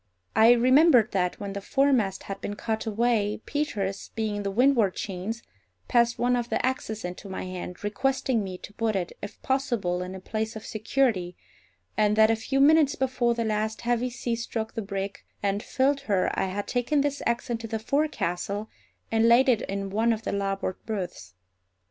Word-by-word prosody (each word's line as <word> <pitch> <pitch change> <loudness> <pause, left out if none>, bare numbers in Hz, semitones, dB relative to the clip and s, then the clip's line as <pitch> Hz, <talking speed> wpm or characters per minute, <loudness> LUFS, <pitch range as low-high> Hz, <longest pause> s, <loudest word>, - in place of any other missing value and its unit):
I 225 +2 +7
remembered 255 0 +5
that, 180 -2 0
when 200 -1 -5
the 200 - -4
foremast 255 -6 +1
had 195 - -6
been 205 - -4
cut 220 +1 -3
away, 220 -1 +1
Peters, 205 -10 -2
being 220 -2 -1
in - - -2
the 200 - -2
windward 230 -2 +3
chains, 200 +4 -4 0.4
passed 235 0 +3
one 245 +1 +2
of 240 -1 -2
the - - 0
axes 220 -5 -2
into 180 +3 -7
my 190 - -4
hand, 185 0 -7
requesting 245 +2 0
me 185 -2 -5
to 205 - -11
put 220 0 -1
it, 180 -3 -2
if 205 - -8
possible, 240 -10 0
in 180 +1 -5
a - - -7
place 220 +4 -3
of 220 - -8
security, 215 -5 0 0.6
and 210 -1 +3
that 220 0 +6
a - - +3
few 270 +5 -1
minutes 295 0 +5
before 250 -2 +1
the 230 -1 -1
last 215 0 -1
heavy 240 +1 0
sea 240 -1 -2
struck 225 -1 -4
the 225 - -3
brig 195 -1 -4 0.2
and 200 0 0
filled 275 +4 +1
her 190 -3 +2
I - - 0
had 200 +2 -4
taken 260 +4 +1
this 285 0 -1
axe 235 +1 -1
into 230 -1 -3
the 225 0 -2
forecastle 215 - -1 0.4
and 225 +1 +4
laid 250 +4 +6
it 230 -4 +3
in 195 0 -3
one 225 +3 +2
of 220 0 -5
the - - -2
larboard 195 -1 -2
berths. 180 - -5
220 Hz, 190 wpm, -27 LUFS, 200-245 Hz, 0.6 s, I